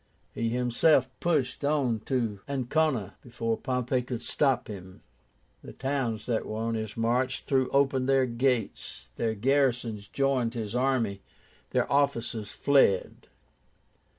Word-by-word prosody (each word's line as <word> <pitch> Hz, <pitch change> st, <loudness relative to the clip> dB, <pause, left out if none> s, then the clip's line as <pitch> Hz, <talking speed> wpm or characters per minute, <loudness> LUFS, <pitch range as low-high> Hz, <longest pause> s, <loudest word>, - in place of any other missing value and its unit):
He 115 Hz, 0 st, -1 dB
himself 125 Hz, +3 st, +3 dB
pushed 145 Hz, -7 st, 0 dB
on 140 Hz, -6 st, +1 dB
to 115 Hz, -6 st, -1 dB
Ancóna, 135 Hz, -, 0 dB
before 115 Hz, -1 st, -2 dB
Pompey 125 Hz, +1 st, -1 dB
could 125 Hz, -1 st, -5 dB
stop 135 Hz, -4 st, +1 dB
him. 95 Hz, -3 st, -10 dB, 0.6 s
The -, -, -10 dB
towns 130 Hz, -5 st, -2 dB
that 115 Hz, -3 st, -1 dB
were 110 Hz, -, -4 dB
on 115 Hz, +1 st, -1 dB
his 110 Hz, -1 st, -4 dB
march 125 Hz, +3 st, 0 dB
threw 130 Hz, -2 st, +1 dB
open 135 Hz, -2 st, +2 dB
their 135 Hz, -1 st, +4 dB
gates, 120 Hz, -, -2 dB
their 110 Hz, -1 st, 0 dB
garrisons 120 Hz, -3 st, +1 dB
joined 130 Hz, -3 st, 0 dB
his 110 Hz, -1 st, -4 dB
army, 125 Hz, -6 st, +1 dB
and -, -, -32 dB
their -, -, 0 dB
officers 120 Hz, -6 st, 0 dB
fled. 135 Hz, -10 st, +2 dB
125 Hz, 130 wpm, -28 LUFS, 115-135 Hz, 0.6 s, their